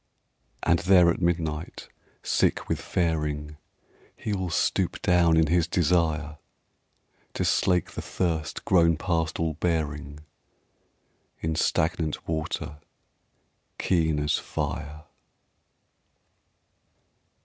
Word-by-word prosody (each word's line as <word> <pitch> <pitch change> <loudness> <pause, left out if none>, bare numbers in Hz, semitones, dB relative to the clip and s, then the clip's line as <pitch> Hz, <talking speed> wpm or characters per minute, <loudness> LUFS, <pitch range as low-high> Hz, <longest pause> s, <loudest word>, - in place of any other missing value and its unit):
And 85 0 +3
there 90 -2 +5
at 85 - -4
midnight 85 -2 -2 0.4
sick - - +1
with - - -2
faring, 75 -3 -2 0.6
He 105 - -3
will 95 -2 -2
stoop 80 - 0
down 85 -2 +4
in 80 - +5
his 85 +1 +2
desire 80 -3 +1 1.0
To - - 0
slake 90 -2 +2
the - - -5
thirst 80 -4 -2
grown 85 -3 +4
past 80 -2 -1
all 80 -1 0
bearing 75 -3 -2 1.2
In 80 0 -1
stagnant 80 0 0
water 80 -2 -3 1.0
keen 80 -4 +1
as 75 +1 +1
fire. 75 +1 -4
80 Hz, 95 wpm, -26 LUFS, 75-85 Hz, 1.2 s, there